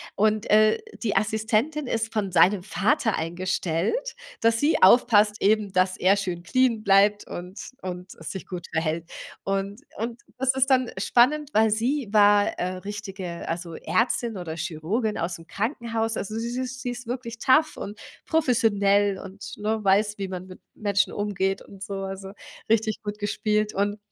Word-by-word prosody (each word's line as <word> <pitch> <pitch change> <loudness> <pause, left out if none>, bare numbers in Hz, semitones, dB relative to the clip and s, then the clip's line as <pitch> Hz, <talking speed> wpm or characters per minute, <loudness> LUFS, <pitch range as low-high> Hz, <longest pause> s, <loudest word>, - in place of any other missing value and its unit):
Und, 215 0 +1
äh, 215 0 +5 0.2
die 220 -4 -1
Assistentin 220 +8 0
ist 225 -1 -2
von 205 -4 -1
seinem 185 +2 +4
Vater 220 - +1
eingestellt, 185 - -2 0.2
dass 230 0 +3
sie 305 - +2
aufpasst 210 0 +5
eben, 210 -1 +2
dass 185 0 +2
er 190 +2 +4
schön 180 -4 -3
clean 240 0 +1
bleibt 200 +1 +4
und 180 +7 -8
und 180 0 -6
es 160 - -7
sich 190 - -7
gut 180 -2 -7
verhält. 160 +1 -2 0.3
Und 195 +4 -2 0.2
und 230 +2 -4 0.2
das 260 0 +2
ist 265 0 +2
dann 255 -3 +3
spannend, 270 +7 +3
weil 220 0 +4
sie 245 +4 0
war, 205 -1 +5
äh, 185 +1 -2
richtige 195 -3 -6
also 170 0 -4
Ärztin 230 0 0
oder 165 -3 -5
Chirurgin 190 +8 -2
ausm 165 -1 -4
Krankenhaus. 225 - -2
Also, 215 +2 -4
sie 235 +1 -3
sie 255 +1 -2
sie 255 -1 -5
ist 245 0 -8
wirklich 235 -2 -5
tough 305 +6 +3
und 205 +1 -7 0.3
professionell 205 -9 +2
und, 195 +1 -9
ne, 215 0 -2
weiß, 205 +2 +2
wie 195 - -2
man 185 0 -6
mit 185 -1 -12 0.2
Menschen 200 -2 +1
umgeht 195 -2 -1
und 195 -1 -15
so. 200 0 -5
Also, 195 0 -6 0.4
richtig 220 -1 +1
gut 205 0 -5
gespielt 210 0 0
und 205 +1 0
210 Hz, 160 wpm, -25 LUFS, 190-230 Hz, 0.4 s, äh